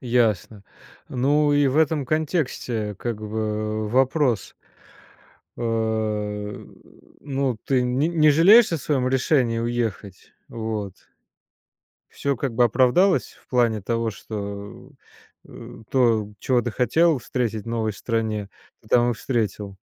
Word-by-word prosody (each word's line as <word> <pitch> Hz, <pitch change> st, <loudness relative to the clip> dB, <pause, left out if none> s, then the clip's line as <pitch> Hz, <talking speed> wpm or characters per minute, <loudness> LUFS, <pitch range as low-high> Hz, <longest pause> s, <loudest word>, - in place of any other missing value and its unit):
Ясно. 115 Hz, -4 st, 0 dB, 0.5 s
Ну 145 Hz, +4 st, +2 dB
и 145 Hz, 0 st, +3 dB
в 130 Hz, -, -1 dB
этом 155 Hz, -2 st, +2 dB
контексте 130 Hz, -, -2 dB
как 120 Hz, -2 st, -3 dB
бы 110 Hz, 0 st, -3 dB
вопрос 130 Hz, -, +1 dB, 1.0 s
э, 110 Hz, -3 st, -2 dB, 0.5 s
ну 135 Hz, -4 st, -2 dB
ты 130 Hz, -2 st, +2 dB
нь 125 Hz, +5 st, +1 dB
не 155 Hz, 0 st, +7 dB
жалеешь 195 Hz, +9 st, +6 dB
о 165 Hz, -, 0 dB
своём 130 Hz, -2 st, 0 dB
решении 130 Hz, -3 st, +1 dB
уехать? 115 Hz, -5 st, -4 dB, 0.2 s
Вот. 110 Hz, -4 st, -4 dB, 1.1 s
Всё 140 Hz, -1 st, -2 dB
как 125 Hz, 0 st, -3 dB
бы 120 Hz, +1 st, +4 dB
оправдалось? 130 Hz, -, +3 dB
В -, -, -25 dB
плане 115 Hz, -4 st, +1 dB
того, 115 Hz, +2 st, -1 dB
что, 100 Hz, -1 st, -8 dB, 0.6 s
э, -, -, -12 dB
то, 115 Hz, -5 st, +2 dB
чего 125 Hz, +2 st, +1 dB
ты 120 Hz, -, -3 dB
хотел 155 Hz, +7 st, +2 dB
встретить 115 Hz, -3 st, -3 dB
в -, -, -9 dB
новой 110 Hz, -2 st, -1 dB
стране, 110 Hz, -1 st, -2 dB, 0.3 s
ты 110 Hz, -, -21 dB
там 120 Hz, +1 st, +4 dB
и -, -, -1 dB
встретил? 105 Hz, -5 st, -3 dB
120 Hz, 125 wpm, -23 LUFS, 110-135 Hz, 1.1 s, не